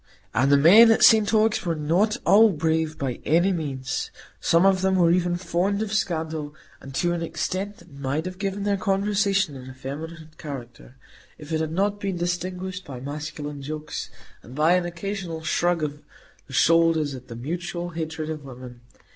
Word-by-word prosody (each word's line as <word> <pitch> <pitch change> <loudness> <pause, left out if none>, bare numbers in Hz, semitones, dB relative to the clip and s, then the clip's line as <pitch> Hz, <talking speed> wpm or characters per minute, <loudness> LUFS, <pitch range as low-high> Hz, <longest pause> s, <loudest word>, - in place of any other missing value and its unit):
And 135 +4 +2
the 140 - +7
men 200 +11 +8
at 225 - +4
St 220 -2 +6
Ogg's 220 0 +2
were 170 -2 -1
not 170 +8 +1
all 220 +2 +7
brave, 160 -2 -1
by 130 -4 -3
any 175 +6 +3
means; 135 -6 -3 0.3
some 170 +3 +3
of 190 -1 +4
them 190 0 +2
were 170 -2 +4
even 175 0 +1
fond 185 +4 -1
of 215 -1 -5
scandal, 160 -6 -2 0.3
and 135 - -10
to 175 +3 +1
an 170 - -3
extent 190 +4 -3
that 165 - -18
might 140 +3 -3
have 185 0 -6
given 200 0 -2
their 200 -1 +1
conversation 195 -3 +1
an 130 -1 -9
effeminate 155 +5 -8
character, 125 -4 -9 0.4
if 150 +1 -11
it 160 0 0
had 160 -1 -2
not 200 +4 0
been 195 -3 -3
distinguished 180 +2 -3
by 135 -6 -8
masculine 145 +1 -6
jokes, 155 +2 -5 0.3
and 120 +5 -13
by 155 +4 +4
an 180 -1 +2
occasional 175 -2 -5
shrug 175 +1 +1
of 145 0 -4 0.5
the - - -12
shoulders 165 -3 +3
at 130 -1 -10
the 115 - -8
mutual 175 +7 -4
hatred 160 -1 -4
of 155 -2 -6
women. 125 -2 -11
165 Hz, 180 wpm, -24 LUFS, 150-190 Hz, 0.5 s, men